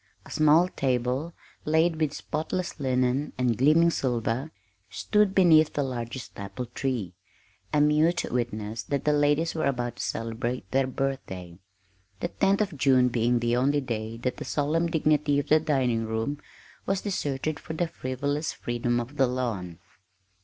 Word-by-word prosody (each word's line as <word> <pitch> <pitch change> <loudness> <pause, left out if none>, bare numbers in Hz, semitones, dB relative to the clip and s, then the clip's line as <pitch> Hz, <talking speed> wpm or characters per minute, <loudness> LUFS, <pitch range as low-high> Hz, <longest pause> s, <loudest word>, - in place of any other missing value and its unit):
A - - -13
small 155 +3 +5
table 130 +2 -1 0.3
laid 160 +2 +2
with 155 -2 0
spotless 160 +3 -3
linen 130 +1 0
and 125 -2 +1
gleaming 155 +7 +4
silver 125 0 -1 0.4
stood 210 -2 +1
beneath 160 -5 +5
the 145 - 0
largest 125 -2 -5
apple 100 +5 -5
tree, 120 -7 -3 0.6
a 150 - +2
mute 150 +3 +3
witness 110 -2 -2
that 140 +4 -3
the 150 - +3
ladies 145 +3 +2
were 160 - 0
about 120 -3 -2
to - - -5
celebrate 115 +1 -3
their 135 0 +2
birthday 95 -11 -4 0.6
the - - -2
10th 195 - +2
of 195 -8 -2
June 130 -2 +4
being 120 0 +1
the 120 0 +1
only 140 +4 +2
day 115 -4 -4
that 125 +2 -3
the - - -5
solemn 155 +4 0
dignity 150 -3 +2
of 145 - -2
the 155 - +6
dining 130 -7 0
room 110 +7 -2 0.5
was 195 0 0
deserted 150 -6 -2
for 160 - -7
the 170 +2 0
frivolous 145 +1 -3
freedom 120 0 -1
of 125 +5 -6
the 135 - +4
lawn. 110 -9 -3
135 Hz, 155 wpm, -27 LUFS, 120-155 Hz, 0.6 s, the